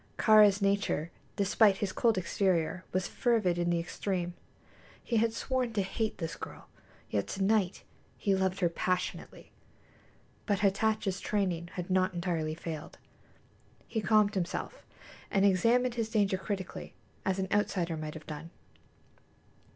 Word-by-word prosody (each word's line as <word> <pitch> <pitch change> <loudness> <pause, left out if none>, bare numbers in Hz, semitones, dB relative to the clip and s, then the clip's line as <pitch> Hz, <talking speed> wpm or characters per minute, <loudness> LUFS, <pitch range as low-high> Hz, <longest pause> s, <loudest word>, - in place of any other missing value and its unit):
Kāra's 210 -2 +6
nature, 195 -5 +1 0.2
despite 200 0 +4
his 195 -2 -2
cold 225 +1 +2
exterior, 185 -1 0
was 185 -1 0
fervid 215 -8 +1
in 175 0 +1
the 170 - +2
extreme. 175 +1 -2 0.7
He 235 - 0
had 225 +1 +3
sworn 250 0 -1
to 205 -3 +1
hate 215 +3 -2
this 165 -2 -4
girl, - - -9 0.4
yet 100 -2 0
to 195 - -2
night 200 -2 +1 0.3
he 200 - +1
loved 190 0 0
her 175 - +4
passionately. 180 +2 -3 1.0
But 205 -2 +1
Hatatcha's 200 -1 +1
training 180 -5 -1
had 180 0 -5
not 185 0 +2
entirely 165 -3 -1
failed. 160 -2 -7 0.9
He 220 - -2
calmed 215 -1 +4
himself, 185 -3 -4 0.4
and 195 0 +3
examined 230 +6 +3
his 230 -2 -2
danger 200 -4 +1
critically, 190 -2 -5 0.3
as 190 0 0
an 190 0 -1
outsider 185 -5 +1
might 155 0 -5
have 160 - -9
done. 155 +2 -7
190 Hz, 140 wpm, -31 LUFS, 175-210 Hz, 1.0 s, Kāra's